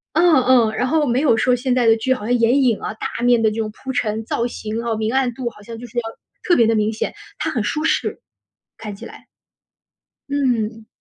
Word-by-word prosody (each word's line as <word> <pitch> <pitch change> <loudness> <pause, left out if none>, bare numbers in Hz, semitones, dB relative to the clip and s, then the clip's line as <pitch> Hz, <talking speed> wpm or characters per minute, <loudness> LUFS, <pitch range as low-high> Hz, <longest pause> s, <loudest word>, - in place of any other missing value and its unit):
嗯 335 -6 +5
嗯， 240 -4 +4
然 250 +3 -1
后 310 +1 +2
没 245 0 +1
有 275 -6 +3
说 250 +3 +2
现 250 +1 0
在 245 -2 +2
的 225 0 +5
剧 260 +4 +1
好 255 - -6
像 245 - +1
眼 245 +3 +3
影 235 -5 +2
啊， - - -4
大 225 - -5
面 245 -1 +4
的 220 -1 +3
这 215 - -6
种 220 -1 -1
铺 265 - -6
陈 220 -3 -1
造 235 +1 -1
型 220 -1 -5
啊， 230 -1 -1
明 220 +2 -2
暗 260 -2 +1
度 240 -1 -3
好 210 - -17
像 230 +2 -9
就 245 - -9
是 240 - -12
要 240 - +1 0.4
特 350 - +3
别 235 - +5
地 225 - +3
明 215 0 +1
显， - - -3 0.2
它 - - -2
很 235 - -1
舒 305 +8 -1
适 - - 0 0.6
看 210 -2 -7
起 - - -10
来。 - - -12 1.0
嗯。 230 -6 -1
235 Hz, 255 characters per minute, -20 LUFS, 220-255 Hz, 1.0 s, 嗯